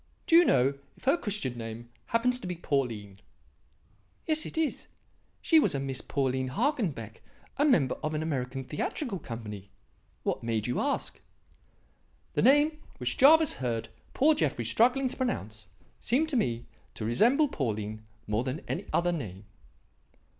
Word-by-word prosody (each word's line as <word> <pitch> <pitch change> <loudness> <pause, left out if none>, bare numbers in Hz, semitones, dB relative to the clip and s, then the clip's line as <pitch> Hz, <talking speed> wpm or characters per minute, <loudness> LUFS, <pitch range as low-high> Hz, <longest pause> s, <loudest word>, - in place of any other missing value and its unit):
Do 330 - +4
you 345 - +9
know 135 - +3 0.2
if - - -19
her 270 +5 +4
Christian 200 - -3
name 115 +1 -7 0.2
happens 250 +2 +1
to 215 - -7
be 180 - -3
Pauline?" 115 - -2 1.1
"Yes, 310 -1 +2
it - - -9
is. 320 -2 -1 0.6
She 325 - +6
was 280 - +2
a - - 0
Miss 135 -1 -3
Pauline 130 -2 -1
Hagenbeck, 160 - -2 0.4
a 290 - +3
member 155 - +3
of 155 0 -2
an 155 - -1
American 135 -4 -3
theatrical 195 - -3
company. 105 - -7 0.5
What - - -1
made 115 -2 -1
you 125 - -1
ask?" 285 - -2 1.1
"The - - +1
name 295 +4 +4 0.2
which 125 -1 -1
Jervis 310 +3 +6
heard 115 -3 -2 0.3
poor 310 +4 +5
Jeffrey 140 - -1
struggling 250 - +3
to 255 - -5
pronounce 110 - -3 0.3
seemed 290 +7 +1
to 295 - -1
me 120 - 0 0.3
to 110 - -5
resemble 240 - +4
Pauline 110 - -3 0.2
more 105 +3 0
than 130 +5 -3
any 195 +4 -3
other 175 +1 +2
name." 105 - -5
140 Hz, 155 wpm, -29 LUFS, -, 1.1 s, you